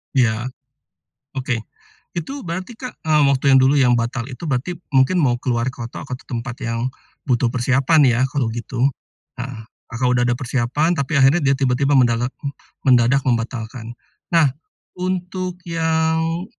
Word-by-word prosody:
Iya. 120 Hz, -2 st, +2 dB, 0.9 s
Oke. 130 Hz, -2 st, -1 dB, 0.6 s
Itu 270 Hz, -, -4 dB
berarti 185 Hz, +6 st, -5 dB
Kak, 255 Hz, 0 st, -8 dB
eee, 155 Hz, -1 st, +4 dB
waktu 135 Hz, -1 st, 0 dB
yang 135 Hz, -, +7 dB
dulu 135 Hz, +2 st, +4 dB
yang 125 Hz, -3 st, +4 dB
batal 120 Hz, +1 st, -2 dB
itu 130 Hz, +6 st, -8 dB
berarti 135 Hz, +6 st, -1 dB, 0.2 s
mungkin 135 Hz, +7 st, +4 dB
mau 125 Hz, -5 st, +2 dB
keluar 120 Hz, 0 st, -1 dB
ke 130 Hz, -1 st, -9 dB
kota 115 Hz, -, -8 dB
atau 125 Hz, -2 st, -5 dB
tempat 120 Hz, -1 st, -5 dB
yang, 115 Hz, +2 st, -1 dB, 0.4 s
butuh 125 Hz, 0 st, +3 dB
persiapan 130 Hz, +5 st, +3 dB
ya, 120 Hz, 0 st, +1 dB
kalau 135 Hz, -4 st, -1 dB
gitu? 120 Hz, +3 st, 0 dB, 0.5 s
Nah, 125 Hz, -2 st, -6 dB, 0.2 s
Kakak 125 Hz, +2 st, -1 dB
udah 120 Hz, -1 st, +2 dB
ada 120 Hz, -, +2 dB
persiapan, 130 Hz, +5 st, 0 dB
tapi 140 Hz, +2 st, -1 dB
akhirnya 135 Hz, +5 st, +6 dB
dia 135 Hz, -4 st, +3 dB
tiba-tiba 135 Hz, +1 st, +1 dB
mendagak 125 Hz, 0 st, +2 dB, 0.5 s
mendadak 125 Hz, +1 st, +4 dB
membatalkan. 115 Hz, -1 st, -2 dB, 0.4 s
Nah, 165 Hz, -4 st, +5 dB, 0.5 s
untuk 185 Hz, 0 st, -3 dB
yang, 160 Hz, +1 st, 0 dB
130 Hz, 150 wpm, -20 LUFS, 120-160 Hz, 0.9 s, yang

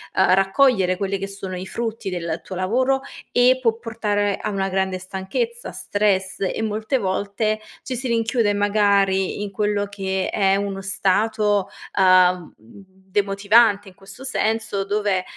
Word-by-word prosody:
uhm, 185 Hz, -1 st, +4 dB
raccogliere 195 Hz, -1 st, +3 dB
quelli 195 Hz, 0 st, -2 dB
che 195 Hz, -, -4 dB
sono 195 Hz, -1 st, -7 dB
i 185 Hz, +1 st, -6 dB
frutti 225 Hz, 0 st, -4 dB
del 170 Hz, -3 st, -3 dB
tuo 190 Hz, -, -7 dB
lavoro, 255 Hz, +9 st, +1 dB, 0.3 s
e 250 Hz, +1 st, +4 dB
può 230 Hz, -3 st, +2 dB
portare 210 Hz, -3 st, -1 dB
a -, -, -2 dB
una 195 Hz, -1 st, -1 dB
grande 190 Hz, 0 st, -1 dB
stanchezza, 190 Hz, -, -4 dB
stress 195 Hz, -2 st, -1 dB
e 195 Hz, +3 st, -1 dB
molte 220 Hz, +4 st, -1 dB
volte 205 Hz, +1 st, -1 dB, 0.2 s
ci 255 Hz, -, -4 dB
si 250 Hz, +2 st, -3 dB
rinchiude, 230 Hz, -2 st, +1 dB
magari, 200 Hz, -1 st, +2 dB
in 205 Hz, -, -5 dB
quello 205 Hz, 0 st, 0 dB
che 190 Hz, -1 st, -2 dB
è 195 Hz, -2 st, +2 dB
uno 200 Hz, -1 st, -3 dB
stato, 200 Hz, +1 st, +1 dB, 0.3 s
uhm, 185 Hz, -2 st, +4 dB
demotivante 200 Hz, -, +1 dB
in -, -, -18 dB
questo 195 Hz, +6 st, -12 dB
senso, 220 Hz, -5 st, -1 dB
dove, 200 Hz, -2 st, 0 dB
200 Hz, 145 wpm, -22 LUFS, 190-215 Hz, 0.3 s, uhm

